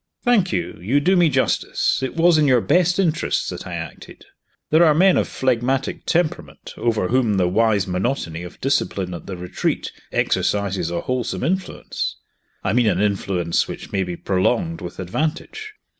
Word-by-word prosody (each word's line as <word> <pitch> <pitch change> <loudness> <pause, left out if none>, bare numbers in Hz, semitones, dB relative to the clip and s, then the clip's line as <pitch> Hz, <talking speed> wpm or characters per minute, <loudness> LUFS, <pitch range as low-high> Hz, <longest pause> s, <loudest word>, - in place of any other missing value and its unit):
"Thank 230 -7 +3
you 90 -2 -3
you 120 +11 +2
do 185 +6 +3
me 175 -3 +5
justice 130 -2 +1
it 130 - -3
was 165 -1 +4
in 150 - +3
your 130 -2 +5
best 175 +7 +2
interests 165 -5 0
that - - -7
I - - -5
acted. - - -9 0.5
There 160 +3 +6
are 155 -3 +5
men 185 +3 +5
of - - +1
phlegmatic 130 +1 -1
temperament, 170 -2 -2
over 110 -6 0
whom 120 -4 +2
the 90 -2 +2
wise 105 +1 +2
monotony 90 -3 -2
of 90 - -10
discipline 100 -9 0
at 85 - -8
The 95 - -5
Retreat 90 0 -2 0.2
exercises 100 -4 0
a 85 0 -2
wholesome 130 -1 -2
influence 185 +2 -2 0.5
I - - 0
mean 120 -1 +3
an 90 -4 +2
influence 95 -4 0
which - - -8
may 95 - 0
be 90 -1 -4
prolonged 125 - 0
with - - -7
advantage. 160 - -4
125 Hz, 170 wpm, -21 LUFS, -, 0.5 s, There